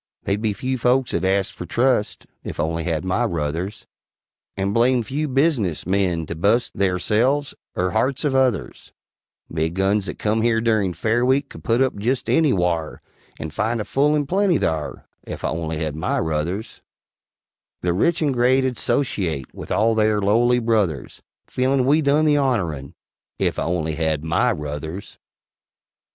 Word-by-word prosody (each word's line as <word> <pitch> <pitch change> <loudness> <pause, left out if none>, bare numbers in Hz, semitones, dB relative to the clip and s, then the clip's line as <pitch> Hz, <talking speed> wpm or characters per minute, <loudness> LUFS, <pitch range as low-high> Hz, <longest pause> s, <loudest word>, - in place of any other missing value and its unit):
They'd 100 +2 -1
be 110 -2 0
few 130 +5 -3
folks 125 +2 +2
'ud 85 - 0
ast 95 0 +1
fer - - -7
trust, 120 +1 0 0.2
Ef - - -7
I - - +2
only 80 +1 -2
had 85 0 -1
my 95 +6 +1
ruthers, 85 +1 -3 0.7
And 100 +1 -1
blame 120 +1 +3
few 145 +6 -2
business 135 - +1
men 90 -3 0
to 85 - -5
bu'st 105 +9 +1
Theyrselves, 105 +9 +1 0.2
er 90 0 0
harts 130 +8 0
of 145 -3 +1
others: 130 -7 0 0.6
Big 80 +1 -1
Guns 95 +1 +1
that - - -5
come 110 +1 0
here 115 0 +2
durin' 110 -6 +1
Fair 110 +7 +1
Week 130 +3 +2
could - - -12
put 115 +3 +3
up 130 - -1
jest 120 +6 -1
anywhare, 90 - +1 0.4
And 80 -1 -6
find 115 +6 -1
a 105 - -3
full 145 +2 +2
and 145 -2 0
plenty 190 -1 +2
thare, 80 - -2 0.2
Ef - - -7
I - - 0
only 80 -1 -3
had 75 -2 -3
my 80 +4 -1
ruthers: 80 +7 -3 1.0
The 90 -1 0
rich 165 - +1
and 145 -3 +1
great 130 +2 +3
'ud 130 -2 -2
'sociate 85 - -1
With - - -9
all 115 +1 +2
theyr 110 -1 +2
lowly 115 +5 +3
brothers, 105 - -1 0.2
Feelin' 130 0 +1
we 150 +4 +4
done 145 +2 +3
the 145 -1 +4
honorun 85 - -1 0.4
Ef - - 0
I - - -1
only 80 -2 -1
had 80 -1 -1
my 90 +10 +2
ruthers. 80 +3 -6
105 Hz, 170 wpm, -22 LUFS, 85-130 Hz, 1.0 s, we